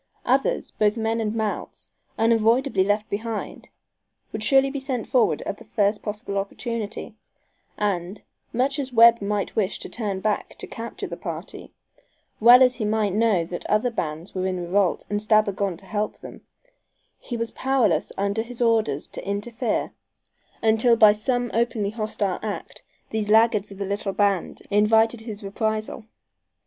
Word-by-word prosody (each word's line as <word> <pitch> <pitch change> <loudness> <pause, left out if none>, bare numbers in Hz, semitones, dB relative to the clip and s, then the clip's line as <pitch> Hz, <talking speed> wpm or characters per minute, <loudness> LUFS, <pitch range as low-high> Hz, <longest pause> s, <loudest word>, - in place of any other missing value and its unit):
Others, - - +1
both 210 +1 +1
men 225 0 0
and 215 0 -2
mounts, 220 -2 -4 0.3
unavoidably 230 0 +3
left 205 +2 0
behind, 220 +1 -5 0.6
would 215 - -5
surely 270 +4 +4
be 280 - -3
sent 260 -4 -3
forward 250 -3 +2
at - - -4
the - - -12
first 205 -1 0
possible 210 -1 -3
opportunity, 215 +1 -4 0.6
and, 195 -1 -2 0.3
much 270 +5 0
as 265 -2 -2
Webb 235 -1 +7
might 200 0 -2
wish 210 -3 0
to - - -7
turn 205 -5 -3
back 210 +1 -2
to - - -8
capture 230 +1 -6
the - - -6
party, - - -7 0.7
well 245 +3 +8
as 250 -1 +3
he 230 - -3
might 210 -2 0
know 210 -5 +2
that 175 +1 -6
other 215 +4 +1
bands 160 -4 -4
were 185 0 -1
in 185 -1 -2
revolt 180 +1 0
and 205 0 -2
Stabber 215 -1 +3
gone 195 -2 -2
to 195 - -14
help 210 +2 -2
them, - - -11 0.8
he 240 - -5
was 230 0 -3
powerless 240 - +1
under 200 +2 0
his 235 +1 -8
orders 220 - +1
to - - -6
interfere 220 +4 -2 0.7
until 225 +2 +4
by 215 -2 +7
some 245 +3 -1
openly 225 -3 0
hostile 215 -4 -2
act 215 -2 -6 0.3
these 215 -1 -2
laggards 220 -1 +4
of 195 - -11
the 200 - -3
little 200 0 -3
band 200 -3 0
invited 220 +2 +3
his 215 -2 -7
reprisal. 215 +2 -3
215 Hz, 160 wpm, -24 LUFS, 200-230 Hz, 0.8 s, well